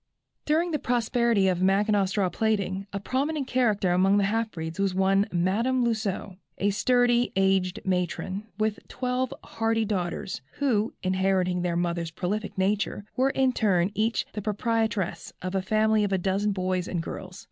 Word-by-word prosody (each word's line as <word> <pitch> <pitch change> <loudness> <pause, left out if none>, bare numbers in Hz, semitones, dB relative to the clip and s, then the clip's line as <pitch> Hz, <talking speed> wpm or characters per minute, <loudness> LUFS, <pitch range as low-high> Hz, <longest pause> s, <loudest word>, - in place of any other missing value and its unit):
During 330 +3 +1
the 300 - 0
prosperity 235 -4 +2
of 180 -1 +1
Mackinaw 200 +1 +3
straw 195 0 0
plaiting, 195 -1 -1
a 200 - -3
prominent 275 +7 -1
character 215 -8 +1
among 190 +3 +4
the 205 - +3
half 225 +3 0
breeds 160 -2 -6
was 195 -2 +1
one 195 +1 +3
Madame 225 +9 +1
Lousseux, 210 -4 -2 0.2
a 205 +1 +1
sturdy, 245 +3 +2
aged 190 0 +2
matron, 190 +2 -2
with 215 0 0
twelve 255 0 -2
hearty 225 0 0
daughters, 185 - -3
who, 230 -6 0
inheriting 185 -1 +1
their 175 -1 -1
mother's 170 -1 -1
prolific 195 +6 -3
nature, 200 +1 0
were 260 +2 +3
in 265 -1 +2
turn 195 -5 +2
each 220 +3 0
the 210 - -4
proprietress 215 -2 -1
of 185 +1 -4
a 190 - +1
family 215 +2 +2
of 205 - -1
a 190 - +2
dozen 195 +3 0
boys 185 -1 -1
and 170 -2 -2
girls. 185 +2 -7
200 Hz, 160 wpm, -26 LUFS, 185-225 Hz, 0.2 s, among